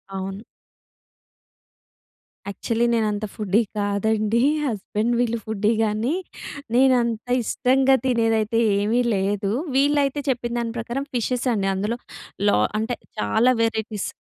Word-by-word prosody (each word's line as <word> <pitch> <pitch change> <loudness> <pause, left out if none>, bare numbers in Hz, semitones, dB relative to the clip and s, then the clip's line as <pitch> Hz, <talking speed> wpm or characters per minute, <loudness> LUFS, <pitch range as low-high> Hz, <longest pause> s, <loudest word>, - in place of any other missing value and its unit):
అవును. 195 +2 -5 2.1
యాక్చువల్లి 230 +3 -1
నేను 225 -2 +2
అంత 205 +1 -3
ఫుడ్డీ 210 +1 +2 0.2
కాదండి. 215 +2 +1 0.2
హస్బెండ్ 220 -1 -1
వీళ్ళు 235 -1 +1
ఫుడ్డీ 215 0 0
గానీ. 220 +6 0 0.6
నేను 260 +1 +5
అంత 235 0 -3 0.2
ఇష్టంగా 265 +3 +3
తినేదైతే 225 -2 +1 0.2
ఏమీ 220 +4 +1
లేదు. 195 +1 -1 0.3
వీళ్ళైతే 285 0 +2
చెప్పిన 240 -2 -1
దాని 230 -1 -3
ప్రకారం 240 +4 -3
ఫిషెస్ 245 +1 -1
అండి. 200 -3 0
అందులో 210 +5 -2 0.5
లా - - +3 0.2
అంటే, 225 +3 -2 0.2
చాలా 220 - +3
వెరైటీస్ 220 -2 -2
225 Hz, 115 wpm, -23 LUFS, 210-240 Hz, 2.1 s, నేను